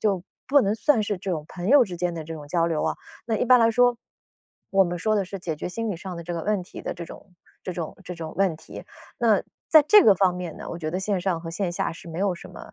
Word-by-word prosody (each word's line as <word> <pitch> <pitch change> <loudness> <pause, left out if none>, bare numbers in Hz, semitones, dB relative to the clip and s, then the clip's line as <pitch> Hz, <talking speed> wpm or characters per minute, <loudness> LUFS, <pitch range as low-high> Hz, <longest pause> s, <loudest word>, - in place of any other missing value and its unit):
就 195 -4 0 0.2
不 285 0 +6
能 205 -1 +1
算 255 +1 +2
是 205 -1 -2
这 190 0 -4
种 155 -3 -2
朋 180 +2 -5
友 275 -2 +7
之 180 -4 -7
间 175 0 -1
的 160 -2 -5
这 165 +1 -6
种 145 -2 -10
交 170 +1 +1
流 160 -2 -1
啊。 - - -1 0.3
那 225 -2 0
一 - - 0
般 250 +1 +6
来 230 - +5
说， 245 0 +3 0.7
我 195 -1 +5
们 175 0 -3
说 215 +4 +1
的 200 - +1
是 195 +2 -7
解 165 -4 -4
决 - - -4
心 225 +4 -3
理 190 - -3
上 185 0 -7
的 170 - -6
这 175 - -5
个 165 -2 -3
问 205 -3 0
题 175 - -10
的 - - -4
这 170 - -7
种 180 +2 -13 0.3
这 185 - -4
种 165 -3 -5
这 180 - -6
种 160 -2 -7
问 190 -5 +2
题， - - -11 0.3
那 220 -4 +3 0.3
在 310 -2 +8
这 420 +2 +8
个 205 - +7
方 185 -1 +2
面 180 -3 -6
呢， - - -8
我 170 - -5
觉 155 -2 -3
得 180 +3 -2
线 195 -1 -1
上 175 -2 -1
和 165 0 -7
线 175 +1 -2
下 - - -2
是 170 - -12
没 165 +1 -6
有 195 -2 +1
什 - - -11
么， - - -12
185 Hz, 310 characters per minute, -25 LUFS, 170-210 Hz, 0.7 s, 在